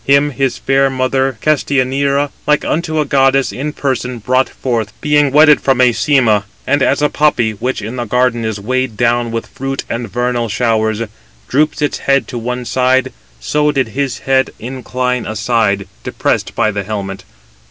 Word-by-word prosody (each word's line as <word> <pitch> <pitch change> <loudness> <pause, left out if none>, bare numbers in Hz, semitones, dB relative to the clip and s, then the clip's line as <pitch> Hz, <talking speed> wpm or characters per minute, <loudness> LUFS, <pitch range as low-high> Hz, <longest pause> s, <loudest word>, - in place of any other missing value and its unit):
Him 140 +1 +3
his 135 -1 -1
fair 135 0 +2
mother 130 -1 0
Castianira, 140 -1 +1 0.2
like 150 0 +2
unto 160 -1 -1
a 150 - +1
goddess 135 -1 +2
in 145 +4 -4
person, 125 -4 -2
brought 130 +4 +1
forth, 115 -5 -3
being 150 -1 +3
wedded 150 +1 +6
from 135 -2 +2
Æsyma. 120 -3 +3 0.2
And 145 +1 +1
as 140 +2 +2
a 150 - +3
poppy, 135 -7 +2
which 115 +2 -3
in 115 +5 -5
the 120 - -2
garden 125 +1 +1
is 110 -2 -3
weighed 130 +1 -2
down 120 0 +1
with 115 0 -3
fruit 135 +1 -5
and 115 -2 -4
vernal 120 -1 -1
showers, 110 -1 0 0.4
droops 150 +2 +1
its 145 - -1
head 140 0 +1
to 120 - -4
one 125 +1 -4
side, 130 0 +1 0.3
so 150 - +1
did 135 -5 0
his 135 +2 -2
head 130 0 +2
incline 125 0 -3
aside, 110 -3 0 0.2
depressed - - -1
by 110 - +2
the 100 -1 -3
helmet. 95 -1 -5
130 Hz, 165 wpm, -15 LUFS, 115-140 Hz, 0.4 s, wedded